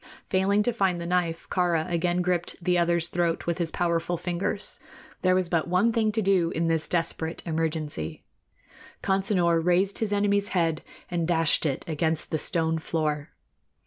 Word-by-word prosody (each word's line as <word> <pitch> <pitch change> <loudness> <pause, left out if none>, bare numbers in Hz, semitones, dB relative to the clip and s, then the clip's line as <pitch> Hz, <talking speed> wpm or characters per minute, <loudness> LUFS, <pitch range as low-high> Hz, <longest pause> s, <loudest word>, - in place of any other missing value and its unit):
Failing 195 +2 +2
to 245 - 0
find 190 -5 +1
the 170 - -5
knife, 170 -2 -1
Kāra 175 -3 +1
again 175 +1 0
gripped 175 0 -1
the 180 0 +2
other's 170 -1 +2
throat 170 -1 -1
with 170 +1 -2
his 170 -2 0
powerful 170 +1 -1
fingers. 180 +4 -2 0.4
There 185 0 +3
was 185 -1 +1
but 170 -2 0
one 185 +6 +2
thing 220 -2 +2
to 220 0 0
do 185 -4 +3
in 165 0 -1
this 160 -1 0
desperate 165 -1 -1
emergency. 155 - -3 0.8
Consinor 185 -4 +2
raised 180 +3 +2
his 220 -2 -1
enemy's 205 0 +1
head 165 -2 +1 0.3
and 170 -2 -1
dashed 165 -2 +3
it 135 - -3
against 160 0 +1
the 155 - 0
stone 160 +1 +1
floor. 155 -2 -2
170 Hz, 165 wpm, -26 LUFS, 165-185 Hz, 0.8 s, There